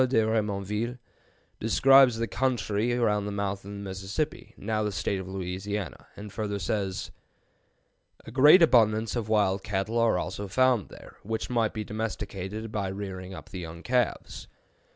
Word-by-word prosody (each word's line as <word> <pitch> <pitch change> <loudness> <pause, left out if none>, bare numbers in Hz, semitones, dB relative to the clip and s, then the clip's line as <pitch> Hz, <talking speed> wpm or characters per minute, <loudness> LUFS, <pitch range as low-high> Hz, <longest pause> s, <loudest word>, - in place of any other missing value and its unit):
de 130 - +1
Remonville, 105 +2 -1 0.6
describes 130 +2 +6
the 115 - 0
country 115 -3 0
around 105 -4 +1
the - - -3
mouth 100 -1 -2
of 100 - -12
the 100 - -6
Mississippi, 100 +9 -4
now 110 +1 -1
the 105 -1 -1
State 95 +1 -1
of 95 - -7
Louisiana, 95 +1 -4
and 105 -1 -9
further 105 -2 -2
says: 95 +1 -2 1.1
"A - - -9
great 150 +8 +7
abundance 110 -6 +4
of 115 -3 -3
wild 100 -3 +2
cattle 105 +3 -1
are 115 -5 +3
also 95 +4 -4
found 125 +1 +2
there, - - -13
which 110 +3 -4
might 115 -3 +1
be 110 - -2
domesticated 105 0 -5
by 100 -3 -2
rearing 95 -1 -6
up - - -11
the 95 - -6
young 85 0 -8
calves." 125 -2 -1
105 Hz, 155 wpm, -28 LUFS, 95-115 Hz, 1.1 s, great